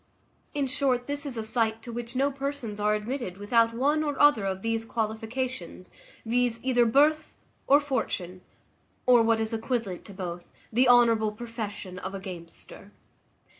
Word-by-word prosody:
In 285 Hz, -1 st, +1 dB
short, 255 Hz, -2 st, 0 dB
this 285 Hz, +1 st, -1 dB
is 255 Hz, -4 st, -5 dB
a 225 Hz, -, -2 dB
sight 225 Hz, 0 st, 0 dB
to 240 Hz, -, -7 dB
which 240 Hz, +1 st, -6 dB
no 275 Hz, +2 st, +2 dB
persons 275 Hz, -6 st, -4 dB
are 210 Hz, 0 st, +2 dB
admitted 215 Hz, -3 st, -4 dB
without 230 Hz, +3 st, +3 dB
one 290 Hz, +5 st, +2 dB
or 290 Hz, -2 st, -3 dB
other 290 Hz, -9 st, +5 dB
of 190 Hz, 0 st, -3 dB
these 225 Hz, 0 st, -1 dB
qualifications, 225 Hz, -3 st, -4 dB, 0.3 s
viz., 240 Hz, 0 st, +1 dB
either 245 Hz, -2 st, +3 dB
birth 300 Hz, +6 st, +3 dB, 0.3 s
or 285 Hz, +2 st, +7 dB
fortune, 210 Hz, -10 st, -3 dB, 0.6 s
or, 245 Hz, -2 st, +6 dB
what 225 Hz, 0 st, +3 dB
is 220 Hz, +1 st, 0 dB
equivalent 225 Hz, -5 st, -2 dB
to 200 Hz, -, -11 dB
both, 175 Hz, -2 st, -6 dB, 0.3 s
the 245 Hz, +2 st, +4 dB
honourable 230 Hz, -3 st, +5 dB
profession 210 Hz, -5 st, -6 dB
of 190 Hz, +2 st, -5 dB
a -, -, -4 dB
gamester. 180 Hz, +1 st, -10 dB
230 Hz, 160 wpm, -27 LUFS, 210-260 Hz, 0.6 s, or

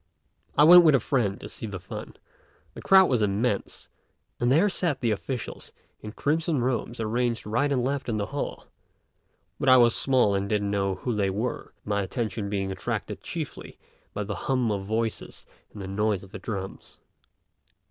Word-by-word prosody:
I 145 Hz, -, +7 dB
went 175 Hz, +3 st, +10 dB
with 155 Hz, -4 st, +6 dB
a -, -, +4 dB
friend 110 Hz, -5 st, 0 dB
to -, -, -8 dB
see 110 Hz, -, -6 dB
the 100 Hz, -2 st, -6 dB
fun; -, -, -8 dB, 0.6 s
the -, -, -9 dB
crowd 190 Hz, -1 st, +6 dB
was 125 Hz, -8 st, +1 dB
immense, 105 Hz, +1 st, -1 dB, 0.5 s
and 120 Hz, +1 st, +2 dB
there 165 Hz, +9 st, +5 dB
sat 175 Hz, -7 st, -1 dB
the 115 Hz, -3 st, 0 dB
officials 120 Hz, +4 st, -5 dB, 0.3 s
in 105 Hz, 0 st, -8 dB
crimson 160 Hz, +2 st, 0 dB
robes 120 Hz, -2 st, -2 dB
arranged 115 Hz, +1 st, -1 dB
right 120 Hz, +7 st, 0 dB
and 130 Hz, -3 st, +1 dB
left 135 Hz, 0 st, -2 dB
in 110 Hz, -, -1 dB
the 100 Hz, -, -1 dB
hall; 145 Hz, -, -4 dB, 0.9 s
but 135 Hz, -, +2 dB
I 130 Hz, -, +8 dB
was 120 Hz, -1 st, +5 dB
small 130 Hz, -6 st, +3 dB
and 100 Hz, 0 st, -1 dB
didn't 105 Hz, -2 st, 0 dB
know 100 Hz, -1 st, 0 dB
who 125 Hz, -, -3 dB
they 100 Hz, -2 st, +1 dB
were, 105 Hz, +6 st, -4 dB
my 100 Hz, -1 st, 0 dB
attention 105 Hz, 0 st, -3 dB
being 95 Hz, -1 st, -2 dB
attracted 95 Hz, -, -4 dB
chiefly -, -, -6 dB, 0.3 s
by 105 Hz, -, -3 dB
the 100 Hz, 0 st, -4 dB, 0.2 s
hum 125 Hz, -4 st, +2 dB
of 100 Hz, -2 st, -3 dB
voices 110 Hz, +1 st, -3 dB, 0.3 s
and 105 Hz, -, -11 dB
the 95 Hz, -, -6 dB
noise 100 Hz, 0 st, 0 dB
of 95 Hz, -, -14 dB
the -, -, -7 dB
drums. 95 Hz, -3 st, -7 dB
115 Hz, 180 wpm, -26 LUFS, 100-130 Hz, 0.9 s, went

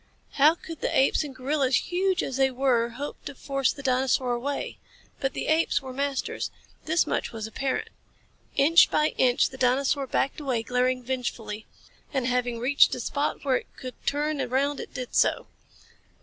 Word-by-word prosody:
How 300 Hz, +4 st, +5 dB
could 330 Hz, -2 st, -10 dB
the -, -, 0 dB
apes 270 Hz, +3 st, +3 dB
and 280 Hz, -3 st, -8 dB
gorillas, 265 Hz, 0 st, +1 dB
huge 370 Hz, -, +1 dB
as 265 Hz, -, -3 dB
they 270 Hz, 0 st, +4 dB
were, 250 Hz, -3 st, +1 dB
hope 280 Hz, +5 st, -7 dB
to 285 Hz, -, -6 dB
force 275 Hz, 0 st, 0 dB
the 280 Hz, -, -9 dB
dinosaur 255 Hz, -1 st, +1 dB
away? 270 Hz, +4 st, -3 dB, 0.4 s
But 270 Hz, -1 st, -1 dB
the -, -, -3 dB
apes 320 Hz, +1 st, +2 dB
were 265 Hz, -2 st, -8 dB
masters. 275 Hz, 0 st, -2 dB, 0.4 s
This 320 Hz, +2 st, +2 dB
much -, -, -2 dB
was 220 Hz, -2 st, -5 dB
apparent. 260 Hz, +4 st, -2 dB, 0.7 s
Inch 330 Hz, +5 st, +6 dB
by 305 Hz, 0 st, +2 dB
inch 250 Hz, -1 st, +4 dB
the 260 Hz, -, -11 dB
dinosaur 270 Hz, +2 st, +2 dB
backed 275 Hz, -, 0 dB
away, 255 Hz, -6 st, -1 dB
glaring 250 Hz, +1 st, 0 dB
vengefully. 235 Hz, -4 st, -4 dB, 0.4 s
And 265 Hz, -4 st, -1 dB
having 245 Hz, -1 st, 0 dB
reached 255 Hz, +5 st, +4 dB
a -, -, -6 dB
spot 285 Hz, +4 st, -2 dB
where 260 Hz, -2 st, +3 dB
it -, -, -8 dB
could 255 Hz, -1 st, -7 dB
turn 295 Hz, 0 st, 0 dB
around 265 Hz, +3 st, 0 dB
it -, -, -7 dB
did 250 Hz, -1 st, -6 dB
so. -, -, +2 dB
265 Hz, 175 wpm, -26 LUFS, 250-285 Hz, 0.7 s, Inch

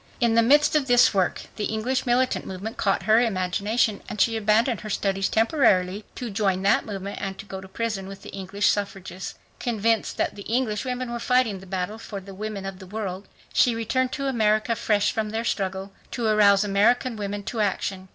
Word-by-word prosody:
In 235 Hz, -2 st, +3 dB
the 230 Hz, -, +5 dB
midst 290 Hz, +6 st, +4 dB
of 290 Hz, -3 st, +2 dB
this 245 Hz, -2 st, +5 dB
work 190 Hz, -3 st, 0 dB
the 210 Hz, -, -1 dB
English 245 Hz, +5 st, -1 dB
militant 250 Hz, +1 st, +2 dB
movement 195 Hz, +4 st, -6 dB
caught 195 Hz, -2 st, 0 dB
her 220 Hz, +1 st, +5 dB
imagination 205 Hz, 0 st, 0 dB
and 210 Hz, -, -6 dB
she 225 Hz, +3 st, +3 dB
abandoned 220 Hz, +2 st, +2 dB
her 215 Hz, -, -7 dB
studies 195 Hz, -1 st, 0 dB
temporarily 210 Hz, -5 st, +2 dB
to 245 Hz, -4 st, -5 dB
join 195 Hz, -2 st, 0 dB
that 200 Hz, +3 st, +3 dB
movement 200 Hz, -1 st, -5 dB
and 195 Hz, +1 st, -5 dB
go 190 Hz, -1 st, -6 dB
to 190 Hz, -, -11 dB
prison 195 Hz, -1 st, -3 dB
with 195 Hz, 0 st, -10 dB
the -, -, -9 dB
English 195 Hz, +1 st, -3 dB
suffragists. 195 Hz, -2 st, -2 dB, 0.2 s
Convinced 225 Hz, -1 st, 0 dB
that -, -, 0 dB
the 205 Hz, -, -10 dB
English 225 Hz, 0 st, -1 dB
women 250 Hz, -1 st, -3 dB
were 240 Hz, -, -3 dB
fighting 245 Hz, -5 st, +2 dB
the 190 Hz, -, -13 dB
battle 190 Hz, +3 st, -3 dB
for 205 Hz, -3 st, -6 dB
the 195 Hz, +1 st, -11 dB
women 205 Hz, 0 st, -5 dB
of 195 Hz, -1 st, -6 dB
the 190 Hz, -, -11 dB
world, 195 Hz, -1 st, -5 dB, 0.3 s
she 240 Hz, -2 st, +4 dB
returned 250 Hz, +3 st, 0 dB
to 275 Hz, -, -3 dB
America 225 Hz, -2 st, +2 dB
fresh 210 Hz, -2 st, +1 dB
from 220 Hz, -1 st, -2 dB
their 225 Hz, +2 st, -3 dB
struggle, 195 Hz, -2 st, -2 dB, 0.2 s
to 240 Hz, -, -3 dB
arouse 205 Hz, -2 st, +5 dB
American 225 Hz, +5 st, +2 dB
women 205 Hz, -1 st, -4 dB
to 225 Hz, -, -4 dB
action. 195 Hz, -2 st, -1 dB
210 Hz, 200 wpm, -25 LUFS, 195-230 Hz, 0.3 s, the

